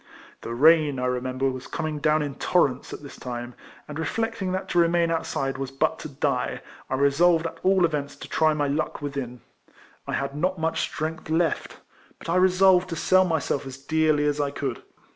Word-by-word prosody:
The 115 - -5
rain, 155 +1 +5
I 125 - -1
remember, 130 +1 -1
was 130 0 -7
coming 155 -2 -3
down 155 +1 +2
in 145 -1 -4
torrents 145 -3 +1
at - - -8
this 140 - -10
time, 120 -1 -6 0.3
and, 150 +1 -6
reflecting 225 +3 -2
that 185 +1 -3
to 175 - +2
remain 170 0 +3
outside 135 -4 -2
w^as 135 0 -4
but 160 +2 +1
to 155 - -7
die, 135 - -2 0.3
I 130 - 0
resolved 160 +5 +3
at 165 - -5
all 190 -1 +4
events 150 -3 -3
to - - -10
try 155 -1 +2
my 145 -1 0
luck 150 +1 -2
within. 135 -4 -5 0.7
I - - -3
had 140 0 -2
not 185 +5 0
much 160 0 -1
strength 160 0 -4
left; 165 0 0 0.4
but - - -10
I 175 - +2
resolved 185 0 +4
to 165 - -3
sell 185 +3 +4
myself 160 -5 -1
as 130 -1 -8
dearly 155 +1 +1
as 145 0 +1
I 145 - 0
could. 140 -3 -4
155 Hz, 195 wpm, -25 LUFS, 140-170 Hz, 0.7 s, rain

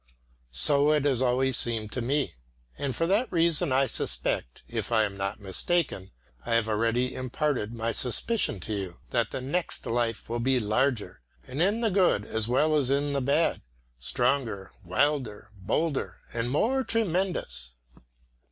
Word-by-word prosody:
So 140 - +4
it 150 -2 +1
has 130 -4 +2
always 130 0 +2
seemed 110 -3 0
to 125 - -2
me. 140 +4 -1 0.4
And 135 -3 -3
for 165 - 0
that 205 +8 +1
reason 165 -4 +3
I 135 +1 +3
suspect - - -1
if 115 -1 -4
I 110 -2 +4
am 100 -2 -3
not 100 +1 -3
mistaken, 100 - -1 0.3
I 115 - 0
have 115 -1 +2
already 115 +4 0
imparted 130 -3 -2
my 115 0 -2
suspicion 125 - +2
to 110 - -4
you 95 -4 -4
that - - +1
the - - -5
next 170 +7 0
life 115 -1 -1
will 120 +1 -3
be 130 +2 +2
larger, 110 - 0 0.2
and 130 +5 -4
in 205 +6 +2
the 225 -3 +1
good 180 - +2
as 110 0 -1
well 150 +6 +2
as 140 -4 +4
in 140 +1 0
the 140 - 0
bad, 140 +5 +1 0.4
stronger, 115 - 0
wilder, 110 - -1
bolder 135 - -2 0.2
and 115 +1 -1
more 245 - +1
tremendous. 180 - -1
125 Hz, 160 wpm, -27 LUFS, 110-150 Hz, 0.4 s, So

